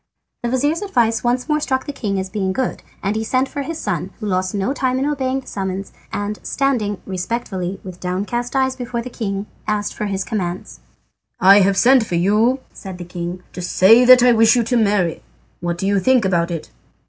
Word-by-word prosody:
The 240 Hz, -, -1 dB
vizir's 290 Hz, +7 st, 0 dB
advice 235 Hz, -, +1 dB
once 245 Hz, +2 st, 0 dB
more 300 Hz, -1 st, +1 dB
struck 260 Hz, -3 st, -1 dB
the 290 Hz, -, -5 dB
king 200 Hz, -7 st, -2 dB
as 190 Hz, -, -3 dB
being 190 Hz, -2 st, -1 dB
good, 260 Hz, +4 st, -2 dB, 0.2 s
and 200 Hz, +2 st, 0 dB
he 220 Hz, -, -1 dB
sent 255 Hz, +4 st, +1 dB
for 285 Hz, -, -5 dB
his 320 Hz, +3 st, -4 dB
son, -, -, -3 dB
who 215 Hz, -, -5 dB
lost 185 Hz, -1 st, -1 dB
no 200 Hz, +6 st, 0 dB
time 260 Hz, -2 st, 0 dB
in 265 Hz, -, 0 dB
obeying 270 Hz, -2 st, -1 dB
the -, -, -23 dB
summons, 190 Hz, 0 st, -4 dB, 0.2 s
and 205 Hz, +1 st, -3 dB
standing 235 Hz, -8 st, -1 dB
respectfully 190 Hz, -1 st, -3 dB
with 185 Hz, -2 st, -9 dB
downcast 210 Hz, +8 st, -3 dB
eyes 265 Hz, -1 st, +1 dB
before 245 Hz, -2 st, -4 dB
the 250 Hz, -, -8 dB
king 200 Hz, -4 st, -3 dB, 0.2 s
asked 210 Hz, -1 st, -1 dB
for 210 Hz, -, -3 dB
his 195 Hz, -1 st, -2 dB
commands. 175 Hz, -, -4 dB, 0.6 s
"I 195 Hz, +2 st, +7 dB
have 195 Hz, 0 st, +3 dB
sent 255 Hz, +2 st, +5 dB
for 195 Hz, -5 st, -3 dB
you," 215 Hz, +9 st, +2 dB
said 190 Hz, -3 st, -8 dB
the 175 Hz, -, -7 dB
king, 175 Hz, +1 st, -6 dB
"to 180 Hz, -, -6 dB
say 195 Hz, +7 st, +5 dB
that 250 Hz, 0 st, +8 dB
I 250 Hz, -, +6 dB
wish 225 Hz, 0 st, +5 dB
you 240 Hz, -, +2 dB
to 230 Hz, +2 st, -1 dB
marry. 200 Hz, -7 st, +1 dB, 0.4 s
What 175 Hz, 0 st, -2 dB
do 190 Hz, -, -3 dB
you 200 Hz, 0 st, +2 dB
think 250 Hz, +2 st, +3 dB
about 170 Hz, -2 st, +1 dB
it?" 165 Hz, -, -5 dB
210 Hz, 210 wpm, -19 LUFS, 190-255 Hz, 0.6 s, that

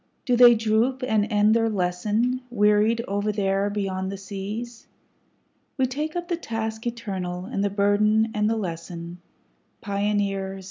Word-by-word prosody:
Do 250 Hz, -3 st, +2 dB
they 240 Hz, -1 st, +8 dB
droop 225 Hz, +4 st, +1 dB
and 220 Hz, -3 st, +1 dB
end 210 Hz, +1 st, +4 dB
their 225 Hz, 0 st, +2 dB
lesson, 210 Hz, +6 st, 0 dB
wearied 215 Hz, +1 st, +2 dB
over 205 Hz, +2 st, -1 dB
there 195 Hz, -1 st, 0 dB
beyond 190 Hz, -2 st, -2 dB
the 200 Hz, -, -5 dB
seas? 205 Hz, +5 st, -6 dB, 0.9 s
We 265 Hz, -, +3 dB
take 300 Hz, +5 st, -3 dB
up 350 Hz, 0 st, -3 dB
the 345 Hz, -2 st, -1 dB
task 225 Hz, -4 st, -4 dB
eternal, 190 Hz, -6 st, -4 dB
and 200 Hz, -2 st, -2 dB
the 205 Hz, -, +1 dB
burden 210 Hz, +2 st, +2 dB
and 210 Hz, 0 st, +1 dB
the 225 Hz, -, +1 dB
lesson, 170 Hz, -2 st, -6 dB, 0.6 s
Pioneers! 200 Hz, -2 st, -1 dB
210 Hz, 145 wpm, -24 LUFS, 195-230 Hz, 0.9 s, they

